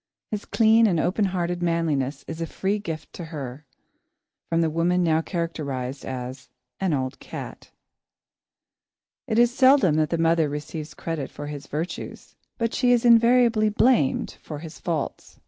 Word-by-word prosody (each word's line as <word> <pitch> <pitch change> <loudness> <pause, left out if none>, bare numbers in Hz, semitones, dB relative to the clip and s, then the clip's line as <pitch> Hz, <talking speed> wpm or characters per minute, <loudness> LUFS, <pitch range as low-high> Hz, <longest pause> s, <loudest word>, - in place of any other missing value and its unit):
His 210 -1 -3
clean 225 0 +4
and 175 -5 +1
open 185 +6 +1
hearted 175 -2 -2
manliness 160 -5 0
is 165 0 -6
a 165 - -2
free 200 +5 -1
gift 160 -6 -6
to 170 - -7
her, 145 -3 -7 0.8
from 165 0 +2
the 165 - +2
woman 175 +3 +2
now 160 -1 +3
characterised 145 -7 -4
as 130 0 -6 0.3
"an 190 -2 0
old 130 -1 -3
cat." - - -8 1.6
It 220 -3 0
is 240 0 +4
seldom 265 - +5
that 155 -1 +2
the 170 - 0
mother 165 -2 +2
receives 150 +1 -6
credit 165 -5 -4
for 145 - -8
his 145 -1 -7
virtues, 160 +5 -6 0.2
but 230 -2 -1
she 245 -1 +2
is 245 -1 +3
invariably 235 -2 +5
blamed 215 - +2
for 150 - -7
his 160 +1 -9
faults. 160 -5 -4
165 Hz, 155 wpm, -24 LUFS, 150-210 Hz, 1.6 s, seldom